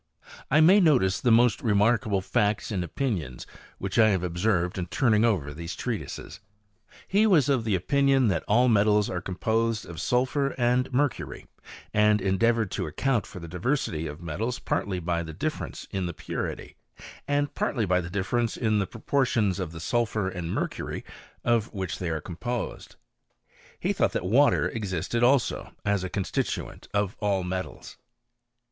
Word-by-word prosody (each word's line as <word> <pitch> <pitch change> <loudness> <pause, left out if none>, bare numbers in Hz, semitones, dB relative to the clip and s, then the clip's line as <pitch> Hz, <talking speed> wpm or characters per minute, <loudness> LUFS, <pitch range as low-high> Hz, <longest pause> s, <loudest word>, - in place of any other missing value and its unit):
I 155 +3 +5
may 185 +6 +7
notice 130 - +3
the 125 - +2
mfli 120 0 +4
remarkable 105 -2 +2
facts 105 +4 0
and 95 -4 -1
opiiiions 85 - -3 0.3
which 95 +4 -2
I 110 -1 +7
have 95 -4 +1
obserytfl 90 0 0
in 90 - -2
turning 110 - +2
over 90 -11 +1
these 85 +2 -6
treatises. - - -5 0.5
'9 - - -24
He 210 +3 +3
was 155 - +4
of 125 -5 +1
opinion 135 +7 +3
that 85 -4 0
all 120 +4 +4
metals 105 -2 +3
are 90 - -3
composed'| 110 -1 -1
sulphur 130 +6 0
and 125 +1 +1
mercury; 140 +2 -1 0.5
and 105 0 +4
endeavoured 105 +3 +1
to - - -3
accoiit 120 - 0
for - - -9
the 85 - -8
diversity 90 - -1
of 75 +3 -8
metals 110 +10 -3
partly 95 -2 -2
by 85 -1 -1
the 80 -2 -7
difference^ - - -4
the 90 -3 -2
purity, 80 - -5 0.5
and 145 0 0
partly 115 -6 -1
by 90 -1 +2
the 85 - -7
difference 110 +5 -1
in 110 -3 +1
the 100 - 0
propM 135 +3 0
tions 100 -6 +1
of 90 -4 -3
the 80 - -8
sulphur 110 +1 0
and 90 -3 -4
mercury - - -3 0.4
of 115 -2 +1
which 95 -3 -3
they 90 - -2
il 80 -2 -2
composed. 95 +10 -5 0.8
He - - 0
thought - - +1
that - - -2
water 130 +10 +4
existed 105 +1 -2
also 125 +1 +2
atf 100 -3 0
constituent 100 -1 -3
of 100 -1 0
all 100 -3 0
metals. 95 +1 -5
105 Hz, 160 wpm, -26 LUFS, 90-120 Hz, 0.8 s, may